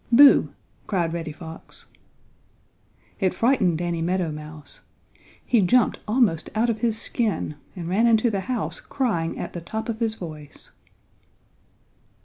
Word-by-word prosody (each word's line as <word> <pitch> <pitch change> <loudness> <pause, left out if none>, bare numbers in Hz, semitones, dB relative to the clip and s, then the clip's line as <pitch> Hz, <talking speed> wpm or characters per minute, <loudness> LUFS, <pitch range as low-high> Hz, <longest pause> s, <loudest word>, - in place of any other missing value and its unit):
"Boo!" 275 +4 +7 0.4
cried 170 -5 0
Reddy 165 -2 -4
Fox. 160 +1 -10 1.3
It 190 -3 +1
frightened 225 -9 +2
Danny 170 -1 -2
Meadow 175 -1 0
Mouse. 150 0 -10 0.6
He 235 -4 +3
jumped 240 +6 +3
almost 215 -8 +2
out 230 +2 +2
of 220 - -5
his 225 -2 +1
skin, 220 -11 -1 0.2
and 175 -3 -6
ran 205 +7 +3
into 230 0 +4
the 200 - -1
house 245 -4 -2
crying 190 -12 -2
at - - -5
the 175 - -5
top 220 +7 -5
of 225 -1 -3
his 225 -2 0
voice. 155 -7 -10
190 Hz, 135 wpm, -24 LUFS, 165-230 Hz, 1.3 s, Boo